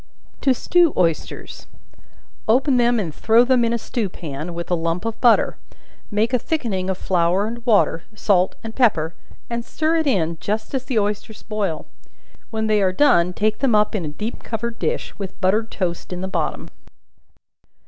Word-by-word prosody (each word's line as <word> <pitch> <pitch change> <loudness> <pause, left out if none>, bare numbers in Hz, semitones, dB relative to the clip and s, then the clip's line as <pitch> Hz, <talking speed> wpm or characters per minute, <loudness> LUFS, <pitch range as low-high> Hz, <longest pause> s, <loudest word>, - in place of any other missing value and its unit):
To 270 - +3
Stew 345 +4 +3
Oysters. 165 -3 -2 0.8
Open 255 +4 +3
them 240 -1 +3
and 170 -7 -3
throw 225 +9 +4
them 250 -1 +3
in 230 - +1
a 235 - +1
stew 225 -2 -3
pan, 160 0 -6
with 170 +1 -5
a - - +4
lump 165 +3 -2
of 225 -1 -4
butter; 240 -2 +4 0.5
make 220 +4 0
a 250 - +3
thickening 220 - -2
of 190 - -1
flour 180 +2 +1
and 235 +2 -6
water, 205 -7 +3
salt 190 -4 +2
and 225 -1 -6
pepper, 170 -11 +2 0.3
and 235 0 -3
stir 315 +6 0
it 320 -2 0
in 170 - +1
just 215 +4 -3
as 265 -1 -2
the 255 -3 -2
oysters 210 +1 -2
boil; 205 -7 -2 0.6
when 220 -1 -2
they 215 -1 +2
are 190 -1 +3
done, 180 -7 +4
take 215 +4 0
them 260 -5 +2
up 210 0 +3
in 205 -5 -1
a - - -3
deep 210 +10 -5
covered 230 +1 -4
dish, - - -2
with 195 -2 -6
buttered 210 +4 +1
toast 175 -2 -3
in 180 0 -4
the 190 - -2
bottom. 170 -5 -2
215 Hz, 180 wpm, -21 LUFS, 180-235 Hz, 0.8 s, throw